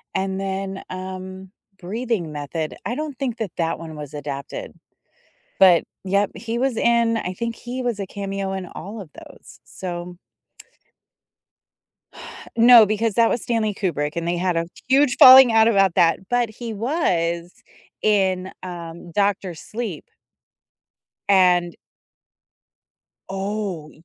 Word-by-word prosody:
and 190 0 -1
then, 195 0 -4
um, 185 0 -7 0.3
Breathing 200 -3 -3
Method. 150 +2 -4
I 240 - -2
don't 300 -3 -5
think 250 -4 -2
that 210 -6 -4
that 165 -1 -1
one 160 -2 -9
was 150 -1 -8
adapted. 140 -1 -6 0.9
But 180 -3 +6 0.2
yep, 200 +1 +1
he 235 0 -4
was 255 -2 0
in 235 0 +2
I 185 -4 -3
think 230 +3 -4
he 250 +1 -6
was 240 -4 -2
a 195 - -3
cameo 195 0 -4
in 190 -1 -4
all 205 +6 -8
of 175 -6 -11
those, - - -15
so. 175 -1 -7 2.4
No, 235 -1 +8
because 215 +1 -1
that 230 +1 +4
was 235 - -1
Stanley 225 -4 -1
Kubrick, 150 -7 -2
and 170 0 -2
they 175 - 0
had 180 -1 0
a 165 - 0 0.2
huge 270 -1 +3
falling 260 -2 +10
out 225 0 +5
about 195 -5 +3
that, 170 +3 +2
but 245 -2 +1
he 230 +1 -7
was 175 - -1 0.5
in, 190 -3 +1
um, 170 -1 -8
Doctor 200 -2 0
Sleep. 210 -1 -6 1.2
And 180 -3 +3 1.5
Oh, 195 -4 -4
195 Hz, 130 wpm, -22 LUFS, 175-230 Hz, 2.4 s, falling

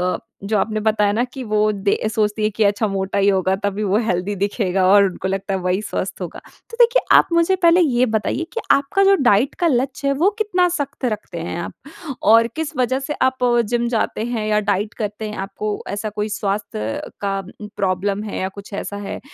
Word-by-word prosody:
अ, - - -4 0.3
जो 210 +2 0
आपने 215 +1 0
बताया 210 -1 +2
न 230 +3 +1
कि 265 -2 -6
वो 215 -1 +2
दे 200 -1 0 0.2
सोचती 215 -1 0
है 215 - +3
कि 220 - +2
अच्छा 205 +1 +2
मोटा 195 0 -2
ही 200 - +3
होगा 190 -1 +2
तभी 200 +1 -1
वो 200 0 +2
हेल्दी 185 +1 -1
दिखेगा 195 -1 0
और 200 +1 +7
उनको 190 0 -3
लगता 195 +1 -2
है 190 - 0
वही 180 +2 0
स्वस्थ - - -4
होगा। - - -6 0.3
तो 465 - -9
देखिए 475 +1 +5 0.2
आप - - +5
मुझे 335 +3 +3
पहले 345 -1 +4
ये 255 -6 +3
बताइए 220 +7 -1
कि 460 - -2
आपका 280 +8 +3
जो 395 0 +6
डाइट 240 +1 +3
का 345 - +3
लक्ष्य 270 0 0
है 275 - +3
वो 325 +8 +3
कितना 365 -4 +2
सख़्त 285 -5 -3
रखते 210 -7 -3
हैं 165 +1 -4
आप? - - -6 0.5
और 225 +2 +6
किस 320 0 -4
वज़ह 255 +1 +1
से 285 +2 -4
आप 260 0 +2 0.4
जिम 240 0 0
जाते 225 -2 -1
हैं 230 -2 -2
या 210 0 +2
डाइट 205 +1 -1
करते 210 0 -4
हैं? 210 - -7
आपको 205 +2 -4
ऐसा 205 +2 -3
कोई 210 +1 -3
स्वास्थ्य 195 - -3 0.2
का 195 -1 -1 0.4
प्रॉब्लम 195 +1 0
है 215 - -5
या 190 - -1
कुछ 200 +1 -12
ऐसा 205 0 -4
है? 205 -1 -5
215 Hz, 215 wpm, -20 LUFS, 200-255 Hz, 0.5 s, और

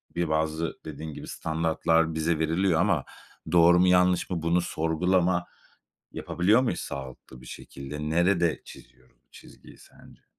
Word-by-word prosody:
bir 85 -2 -1
bazı 80 +1 -1
dediğin 80 0 -7
gibi - - -9
standartlar 80 0 0
bize 80 0 0
veriliyor 80 +2 +1
ama 90 -8 +1 0.5
doğru 85 0 +5
mu 90 - +4
yanlış 90 0 +3
mı 85 -3 -3
bunu 85 +2 +1
sorgulama 90 +2 0 0.7
yapabiliyor 105 +8 +1
muyuz 125 - -2
sağlıklı 65 -1 -9
bir 65 - -15
şekilde? 75 +5 -7
Nerede 85 0 +1
çiziyoruz 65 0 -16
bu - - -51
çizgiyi - - -16
sence? - - -19
80 Hz, 140 wpm, -26 LUFS, 80-90 Hz, 0.7 s, doğru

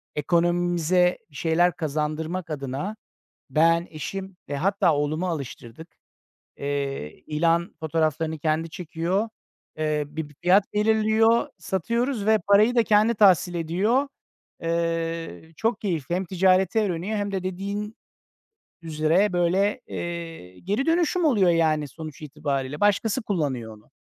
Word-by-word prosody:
ekonomimize 175 +2 +2
bir - - -19
şeyler 170 +3 +2
kazandırmak 155 +3 -3
adına 145 +8 -4 0.6
ben, 165 +2 +3
eşim 190 +4 -6
ve 145 - -3
hatta 185 0 +2
oğlumu 155 +5 -1
alıştırdık. 140 -1 -7 0.6
Eee, 140 - -3
ilan 165 +3 +1
fotoğraflarını 160 0 -1
kendi 155 +1 -1
çekiyor. 180 +6 -2 0.5
Eee, 155 -1 0
bir 150 -1 -6
fiyat 190 +3 +4
belirliyor, 220 +2 +3
satıyoruz 230 - -1
ve 220 0 +5
parayı 210 +5 +5
da 235 - +6
kendi 215 +2 +3
tahsil 185 -4 +4
ediyor. 195 - +1 0.5
Iıı, 165 -1 -2
çok 225 +1 0
keyifli, 170 - -2
hem 185 +2 -1
ticareti 185 +2 +2
öğreniyor 195 +1 -1
hem 205 0 -2
de 190 - -2
dediğin 200 +3 -4 0.9
üzere 165 +5 +1
böyle, 190 +7 +1
eee, 165 - -6
geri 205 +9 -1
dönüşüm 340 +1 +2
oluyor 205 - +4
yani 155 -3 +2
sonuç 155 +2 -9
itibariyle. 145 -1 -3
Başkası 205 +4 +2
kullanıyor 135 - -2
onu. 105 - -24
170 Hz, 120 wpm, -25 LUFS, 155-200 Hz, 0.9 s, da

